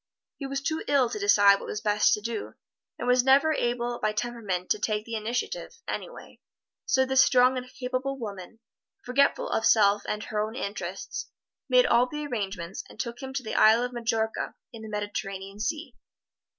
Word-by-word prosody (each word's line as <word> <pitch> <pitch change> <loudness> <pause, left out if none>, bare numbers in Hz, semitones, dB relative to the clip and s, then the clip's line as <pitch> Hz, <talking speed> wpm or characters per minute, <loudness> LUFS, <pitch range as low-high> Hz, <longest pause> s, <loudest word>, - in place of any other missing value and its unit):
He 275 - -5
was 275 0 -3
too 315 +3 -2
ill 265 -4 +3
to - - -4
decide 205 - +5
what - - -8
was 210 - -3
best 210 -1 +3
to 210 - -8
do, 225 0 -5 0.4
and - - -4
was 250 0 +4
never 275 +4 +5
able 240 -2 -1
by 215 0 0
temperament 210 -6 -3
to 215 - +2
take 215 0 -1
the 230 - -8
initiative, 240 - -3
anyway, - - -7 0.5
so 265 -3 +3
this 265 0 +5
strong 255 -1 +4
and 255 0 -5
capable 255 +1 -3
woman, 210 -2 -8 0.4
forgetful 275 +3 +2
of 225 - 0
self 205 -2 +5
and 210 0 -2
her 215 - -3
own 215 +2 -2
interests, 195 -5 -5 0.4
made 250 -1 +6
all 240 +2 +4
the 300 +3 -5
arrangements 195 -8 -4
and - - -15
took 235 +1 -4
him 265 0 -6
to 260 -1 -3
the 220 - -5
Isle 220 +2 +5
of 250 0 -4
Majorca 225 -2 -2 0.2
in 225 - -9
the 220 - -8
Mediterranean 200 -1 -5
Sea. 300 +9 -3
235 Hz, 185 wpm, -27 LUFS, 210-255 Hz, 0.5 s, made